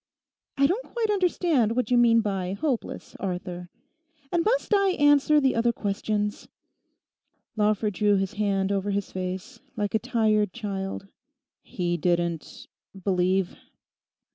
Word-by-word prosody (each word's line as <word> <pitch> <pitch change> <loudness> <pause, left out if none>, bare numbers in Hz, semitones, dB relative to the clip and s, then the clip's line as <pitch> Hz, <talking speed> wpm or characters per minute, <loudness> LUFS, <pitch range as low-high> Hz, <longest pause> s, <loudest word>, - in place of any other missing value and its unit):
'I 275 - +4
don't 390 - -1
quite 450 -3 +1
understand 340 - +1
what 250 0 -1
you 245 - +5
mean 230 -1 +5
by 195 -3 -2
"hopeless," 255 +3 -3
Arthur. 180 -2 -5 0.6
And 340 -1 +2
must 475 +1 +1
I 395 -2 +3
answer 290 -1 +4
the 270 -2 +2
other 235 +1 +2
questions?' 210 -1 -2 1.1
Lawford 210 -1 +1
drew 205 +2 +2
his 195 -1 -1
hand 200 -2 0
over 200 0 -1
his 200 -1 -2
face, 185 0 -5 0.2
like 205 -1 -1
a 220 - +3
tired 215 -4 +1
child. 195 -3 -5 0.5
'He 175 -2 -2
didn't—believe? 180 +2 -1
210 Hz, 125 wpm, -26 LUFS, 190-255 Hz, 1.1 s, you